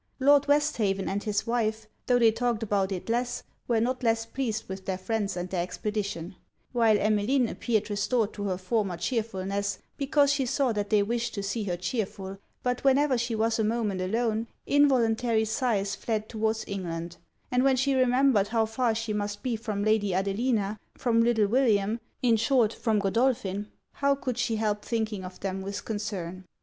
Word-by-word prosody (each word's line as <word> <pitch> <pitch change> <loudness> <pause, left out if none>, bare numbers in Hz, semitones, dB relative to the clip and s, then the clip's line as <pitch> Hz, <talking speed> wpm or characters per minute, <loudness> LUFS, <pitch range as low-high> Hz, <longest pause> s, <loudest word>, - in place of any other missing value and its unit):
Lord 285 +1 +5
Westhaven 235 -10 +1
and 200 +1 -1
his 210 -2 -1
wife, 220 -2 -1 0.2
tho' 245 - +4
they 230 -2 +5
talked 230 0 -1
about 200 -2 0
it 185 -2 -4
less, 240 +1 -1 0.2
were 235 -2 +2
not 255 +3 0
less 225 -1 +1
pleased 225 -3 -3
with 190 0 -7
their 190 -1 -1
friends 200 0 -2
and 175 +1 -3
their 180 -2 0
expedition; 190 -1 -4 0.3
while 230 -3 +4
Emmeline 215 +5 +2
appeared 220 -2 -1
restored 210 +1 0
to 205 - -5
her 185 -2 -1
former 190 -1 -1
chearfulness, 200 -1 -2 0.2
because 285 0 +3
she 270 -3 0
saw 265 0 +1
that 205 -2 -2
they 210 -2 +4
wished 235 +2 -2
to 200 - -3
see 205 +2 -2
her 175 -3 -2
chearful: 195 0 -4 0.2
but 250 0 -1
whenever 275 0 +4
she 235 -1 -1
was 225 +1 +1
a - - +3
moment 215 -4 0
alone, 225 +3 0 0.2
involuntary 240 -5 +3
sighs 220 -3 0
fled 215 -1 -2
towards 220 0 -1
England; 175 -3 -4 0.3
and 250 0 +3
when 270 -1 +4
she 270 +2 +1
remembered 255 -4 +3
how 225 +1 +1
far 225 +1 0
she 225 -1 -2
must 205 0 -3
be 250 -3 0
from 215 -2 -3
Lady 210 -3 +2
Adelina, 200 +2 0 0.2
from 230 -2 +2
little 230 -2 +3
William, 220 -2 +2 0.2
in 235 -2 +4
short, 230 -1 +3
from 225 -3 0
Godolphin, 205 -1 0 0.2
how 280 0 +1
could 255 -3 -4
she 240 -2 +1
help 210 -1 -1
thinking 220 -4 -2
of 185 0 -9
them 190 0 -3
with 200 +1 -5
concern. 195 -4 -4
220 Hz, 180 wpm, -28 LUFS, 200-240 Hz, 0.3 s, Lord